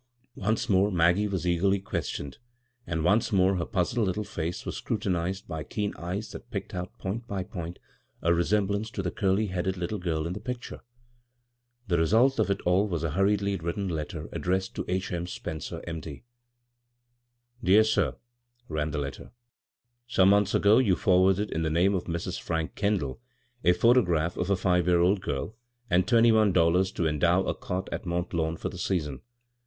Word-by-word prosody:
Once 110 +3 -1
more 100 +1 +3
Maggie 90 +4 +3
was 95 -4 -3
eagerly 95 +3 +2
ques 95 - -3
tioned, 70 -1 -6 0.5
and 80 -2 -2
once 100 +7 +3
more 95 -1 +3
her 85 - -1
puzzled 105 +2 0
little 95 +3 -1
face 85 -3 -4
was - - -4
scrutinized 95 -2 -2
by 80 -3 -4
keen 105 +6 -3
eyes 95 +6 -5
that - - -10
picked 105 -5 -5
out 90 0 -5
point 115 +5 -4
by 95 -2 -3
point 85 -1 -7 0.5
a 85 - +4
resemblance 100 +4 +1
to 100 -4 -4
the 90 - -2
curly 100 0 +1
headed 95 +1 -2
little 90 +4 -3
girl 80 -3 -1
in 85 - -3
the 100 - -5
picture. 120 +3 -6 1.1
The 85 -3 +2
result 115 +10 +3
of 110 - +2
it 100 0 0
all 90 +4 +2
was 85 -5 -3
a 80 - -1
hurriedly 100 +3 +1
written 85 +3 -3
letter 80 -3 -4
ad - - -4
dressed 95 +1 -1
to - - -2
"H. 95 +1 -2
M. 85 -1 -3
Spencer, 85 -1 -6
M. 80 -1 -4
D." 80 - -8
• 70 - -9 0.7
'* 120 0 -36
Dear 105 +3 +6
Sir: 110 0 +1 0.3
" 120 0 -42
ran 75 0 0
the 75 - -3
letter. 70 -1 -5 0.4
" - - -66 0.3
Some 95 -6 +4
months 100 0 +3
ago 105 +4 +5
you 105 -8 +3
forwarded 95 +2 +3
in 80 - -1
the 80 - 0
name 90 +5 +3
of 95 - -1
Mrs. 85 -1 -3
Frank 80 -1 -2
Kendall, 100 - -1 0.4
a 90 - +6
photograph 90 -6 +3
of 90 - -2
a 100 - +4
five 90 -2 +1
year 90 -1 +4
old 95 +2 +3
girl, 75 +11 -4 0.3
and 90 +1 +3
twenty 115 -1 +5
one 110 -2 +4
dollars 90 +2 +3
to 85 - -1
en 75 -1 -1
dow 90 +4 +3
a - - -1
cot 90 +1 -4
at - - -5
Mont 85 0 -2
Lawn 80 -1 -1
for - - -4
the - - -9
season. 75 -8 -2
95 Hz, 200 wpm, -27 LUFS, 85-105 Hz, 1.1 s, Dear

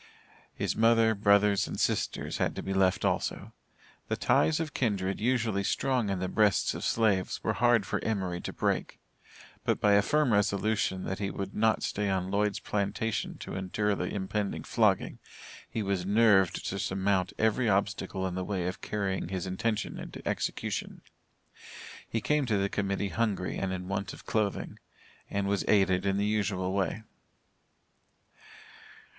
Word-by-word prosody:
His - - -1
mother, 115 0 +4
brothers, 100 -1 +3
and - - -5
sisters - - -1
had - - 0
to - - -5
be 95 - -2
left 95 -1 +2
also. - - -1 0.5
The - - 0
ties 155 - +3
of 155 -4 -3
kindred 100 -6 -1
usually 115 -4 +1
strong 125 0 0
in 95 - 0
the 95 +1 -2
breasts 105 0 +2
of - - -6
slaves, 105 -5 +1
were - - +1
hard 120 -4 +3
for - - -2
Emory 95 -5 -2
to - - -5
break, - - -1 0.6
but, - - +1
by 105 - +3
a 100 - +6
firm 145 +1 +2
resolution, 100 -1 +1
that 95 - -3
he 100 -1 -1
would 100 0 -5
not 110 0 +2
stay 105 -1 -1
on 95 -1 -1
Lloyd's 105 0 +1
plantation 105 +2 -2
to - - -8
endure 100 +3 -1
the - - -2
impending 100 +1 -3
flogging, - - +1 0.5
he 110 - -2
was 100 -2 -1
nerved 100 -2 +3
to 100 - -3
surmount 95 -1 0
every 110 +2 +2
obstacle 100 -1 0
in 95 - -2
the 95 +1 -2
way 95 -2 -2
of 90 +1 -4
carrying 100 -4 -2
his 95 -2 -3
intention 105 +4 -2
into - - -8
execution. - - -3 1.1
He 115 - -1
came 150 0 +1
to 110 -3 +2
the 100 0 0
Committee 100 0 -1
hungry 105 -5 -1
and 95 -1 -2
in 90 -1 -4
want 100 0 -3
of - - -13
clothing, 105 -3 -1 0.5
and 100 0 -1
was 100 -1 0
aided 95 -2 +3
in 100 0 +1
the 100 - +1
usual 100 -3 0
way. 100 +3 -1
100 Hz, 160 wpm, -29 LUFS, 95-110 Hz, 1.1 s, a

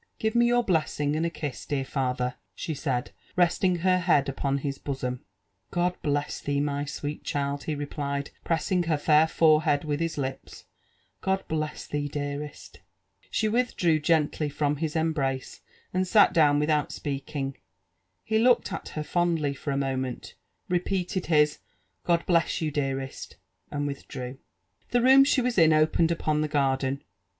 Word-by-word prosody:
" - - -48
Give 220 0 -1
me 240 0 +4
your 240 0 +3
blessing 155 -5 0
and 165 +2 +1
a; - - -1
kiss, 150 -5 -5
dear 135 -2 -2
father 125 -2 -1
I" - - -39 0.2
she 160 - -4
said, 135 -4 -2 0.2
resting 180 +1 +3
her 185 0 +4
head 170 -6 +3
upon 135 0 -1
his 140 0 -4
bosom. 125 -3 -4 0.5
"God 175 +1 0
bless 145 0 -1
thee, 145 0 -1
my 145 0 -1
sweet 145 +1 -5
child 140 0 -2
I" - - -12
he 155 - -1
replied, 140 -1 -3
pressing 175 +2 +1
her 160 -2 +1
fair 150 +1 +4
forehead 155 -2 +3
with 150 -1 -2
his 165 -2 -2
lips, 135 -2 -5 0.2
— - - -39
" - - -44
God 190 0 -1
bless 155 -1 -3
thee, 145 0 -2
dearest!" 145 0 -6 0.3
" 95 0 -49
She 220 - 0
withdrew 210 -9 +2
gently 150 -1 +1
from 145 0 0
his 155 +1 -3
embrace, 145 -5 -1 0.3
and 185 +1 +1
sat 205 +2 +5
down 150 -3 +5
without 150 0 +1
speaking. 135 -1 -4 0.7
He 220 0 +1
looked 245 +2 +3
at - - -5
her 155 - -1
fondly 165 -4 0
for 140 - -6
a 140 - 0
moment, 130 -2 -3 0.3
repeated 180 +1 -1
his 150 -2 +3 0.2
" - - -45
God 170 -1 +2
bless 170 -2 +2
you, 155 -2 -1
dearest 135 -2 -3 0.3
1" - - -5
and 145 - 0
withdrew. 130 -2 -6 0.5
The 245 -1 +2
room 265 +2 +8
she 275 -1 +3
was 245 -4 +1
in 160 -1 +6
opened 155 +2 +3
upon 155 -2 0
the 155 - 0
garden. 135 -2 0
150 Hz, 175 wpm, -27 LUFS, 140-170 Hz, 0.7 s, room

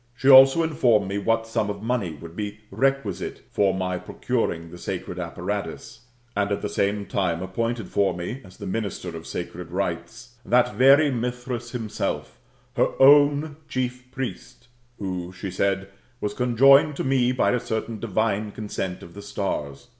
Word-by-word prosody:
She 130 - -2
also 135 +5 +8
informed 120 -10 +2
me 100 +1 -2
what 115 +2 +1
sum 110 -2 -1
of 100 0 -5
money 115 -7 -1
would 80 +3 -11
be 105 0 -5
requisite 135 -9 -1
for 100 -2 +3
my 90 -1 -2
procuring 85 -11 -2
the 90 - -10
sacred - - -5
apparatus, - - -5 0.3
and 100 0 0
at 100 - -1
the 105 - -1
same 100 +1 0
time 90 -4 -1
appointed 115 +3 -2
for 100 -3 +1
me, 105 +10 -5
as 95 -1 -15
the 100 - -8
minister 100 -3 -4
of 80 - -8
sacred 90 0 -6
rites, 95 +6 -4
that 125 -2 +3
very 140 +6 +6
Mithras 125 0 -3
himself, 115 -4 -4 0.4
her - - +1
own 145 +2 +6
chief 125 -1 -3
priest, 125 -1 -6 0.3
who, 90 -2 -4
she 95 +1 -6
said, 95 +1 0 0.3
was 105 - -2
conjoinicd 135 +4 +5
to - - -3
me 130 -2 +2
by 125 - +2
a 125 - +1
certain 110 -1 -4
divine 105 -1 -1
consent 100 -4 -5
of 85 - -12
the 100 - -10
^ - - -13
stars. 75 - -4
110 Hz, 165 wpm, -24 LUFS, 95-125 Hz, 0.4 s, also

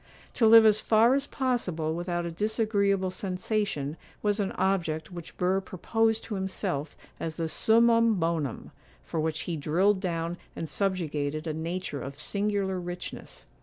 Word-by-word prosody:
To 225 - +3
live 225 0 +9
as 215 0 +5
far 225 +3 +4
as 280 +1 0
possible 180 - -1
without 175 0 -2
a 170 - -3
disagreeable 200 -1 +1
sensation 185 -6 -2 0.3
was 210 0 +1
an 200 -2 0
object 170 -4 -1
which 175 -2 -9
Burr 185 +2 +1
proposed 225 +4 0
to 225 - -6
himself 185 -6 -3 0.2
as 160 -1 -3
the 165 0 -2
summum 230 +5 +4
bonum, 165 - -2 0.3
for 165 - -4
which 155 -1 -1
he 170 - -3
drilled 180 +7 +2
down 170 -2 -2 0.2
and 165 - -4
subjugated 155 -5 -1
a 160 - -2
nature 165 -2 -4
of 140 +2 -7
singular 200 +2 -1
richness. 175 0 -7
185 Hz, 150 wpm, -28 LUFS, 160-210 Hz, 0.3 s, live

